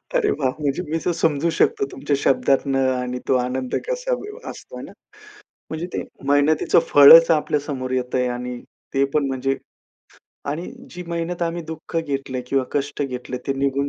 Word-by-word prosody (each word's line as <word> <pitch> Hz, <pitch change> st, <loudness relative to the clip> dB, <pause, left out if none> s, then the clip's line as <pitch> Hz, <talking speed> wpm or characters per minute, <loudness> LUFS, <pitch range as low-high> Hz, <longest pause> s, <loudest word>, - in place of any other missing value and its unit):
अरे 460 Hz, -4 st, +3 dB
वाह! 135 Hz, -3 st, 0 dB
म्हणजे 145 Hz, +4 st, -1 dB
मी 160 Hz, -, 0 dB
तर 180 Hz, -, +2 dB
समजू 165 Hz, -1 st, +1 dB
शकतो -, -, +2 dB
तुमच्या 145 Hz, 0 st, -1 dB
शब्दातनं 135 Hz, 0 st, +2 dB
आणि 125 Hz, 0 st, -3 dB
तो 130 Hz, -, +3 dB
आनंद 125 Hz, +1 st, -2 dB
कसा -, -, -1 dB
ब 420 Hz, +2 st, -9 dB
असतो, -, -, -10 dB
हे -, -, -7 dB
ना? -, -, -12 dB, 0.8 s
म्हणजे 160 Hz, +2 st, -3 dB
ते -, -, -2 dB, 0.3 s
मेहनतीचं 145 Hz, +2 st, +3 dB
फळच 165 Hz, +4 st, +9 dB
आपल्या 150 Hz, -2 st, +2 dB
समोर 130 Hz, -3 st, -5 dB
येतंय 125 Hz, 0 st, 0 dB
आणि 125 Hz, 0 st, -4 dB, 0.4 s
ते 135 Hz, 0 st, +3 dB
पण 150 Hz, -2 st, +2 dB
म्हणजे 135 Hz, 0 st, -1 dB, 0.9 s
आणि 165 Hz, +5 st, -4 dB, 0.2 s
जी 180 Hz, -, -7 dB
मेहनत 170 Hz, +1 st, -3 dB
आम्ही 170 Hz, 0 st, -2 dB
दुःख 160 Hz, +1 st, -7 dB
घेतलंय 135 Hz, -4 st, -3 dB
किंवा 135 Hz, 0 st, +1 dB
कष्ट 145 Hz, 0 st, -2 dB
घेतले 125 Hz, -2 st, -4 dB
ते 135 Hz, -, +1 dB
निघून 140 Hz, +1 st, 0 dB
140 Hz, 170 wpm, -22 LUFS, 130-165 Hz, 0.9 s, फळच